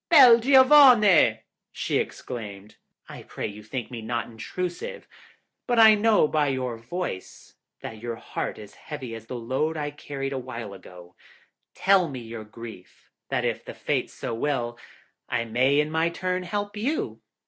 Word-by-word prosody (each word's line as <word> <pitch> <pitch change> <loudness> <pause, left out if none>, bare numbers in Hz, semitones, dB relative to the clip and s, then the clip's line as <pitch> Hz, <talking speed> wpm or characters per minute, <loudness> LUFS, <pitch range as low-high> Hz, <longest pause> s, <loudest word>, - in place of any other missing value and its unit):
'Bel 260 -8 +9
giavone!' 250 - +6 0.3
she - - -1
exclaimed, 105 -4 -6 0.3
'I - - -10
pray - - -6
you 105 +1 -7
think 120 +3 -6
me 120 -2 -6
not 115 +1 -2
intrusive, 180 - -6 0.6
but 240 - +1
I 220 -1 +9
know 210 -5 +3
by 150 -1 +1
your 130 -3 -2
voice 115 - -6 0.3
that 110 - -8
your 120 -1 -4
heart - - -5
is 105 -1 -11
heavy 135 -6 -8
as 115 0 -9
the 125 - -6
load 130 +7 -2
I 145 -1 -3
carried 140 -2 -5
awhile 120 -5 -6
ago. 90 -2 -13 0.6
Tell 190 -2 +3
me 130 -2 -6
your 115 -1 -8
grief, 110 -3 -12 0.2
that - - -1
if - - -2
the - - -9
Fates - - -2
so - - -4
will, 120 -2 -2 0.5
I 115 -1 -1
may 130 +5 +2
in 150 +1 0
my 160 +1 +1
turn 185 +2 -2
help 205 +3 -4
you.' 255 +9 -2
135 Hz, 160 wpm, -25 LUFS, 115-185 Hz, 0.6 s, Bel